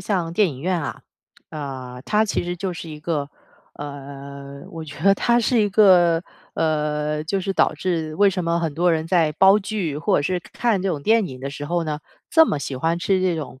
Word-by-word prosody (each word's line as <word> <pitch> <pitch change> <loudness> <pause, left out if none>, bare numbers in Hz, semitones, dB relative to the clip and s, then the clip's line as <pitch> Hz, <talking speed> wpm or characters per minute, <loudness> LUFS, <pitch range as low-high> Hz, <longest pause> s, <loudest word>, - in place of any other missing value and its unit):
像 175 -5 -1
电 195 +1 +3
影 135 -2 -9
院 180 +1 0
啊， - - -5 0.5
呃， 130 -4 -6
它 215 +1 +2
其 205 - -1
实 175 0 -3
就 185 0 -3
是 165 -1 -8
一 150 - -8
个 150 -3 -2 0.5
呃， 140 -1 -9
我 165 -1 -7
觉 145 -1 -10
得 195 0 +6
它 235 +4 +2
是 235 0 +2
一 205 - +2
个 180 -5 +5 0.3
呃， 150 -1 0
就 190 +5 -1
是 195 +1 -2
导 - - +2
致 165 -4 -2
为 200 +2 +4
什 185 -1 -2
么 170 0 0
很 165 -3 -1
多 175 +2 +2
人 160 0 0
在 165 -3 +3
煲 195 +5 +6
剧 190 -8 -3
或 150 - +1
者 145 - +1
是 180 +3 -1
看 220 +1 -1
这 195 - 0
种 150 -6 -2
电 220 0 +3
影 130 - -9
的 140 - -4
时 145 +1 -6
候 170 0 0
呢， 150 -1 -3 0.3
这 320 -1 +6
么 145 - -1
喜 140 - -4
欢 165 +6 0
吃 190 +1 +1
这 180 -3 +1
种， 130 -3 -7
165 Hz, 240 characters per minute, -22 LUFS, 145-190 Hz, 0.5 s, 得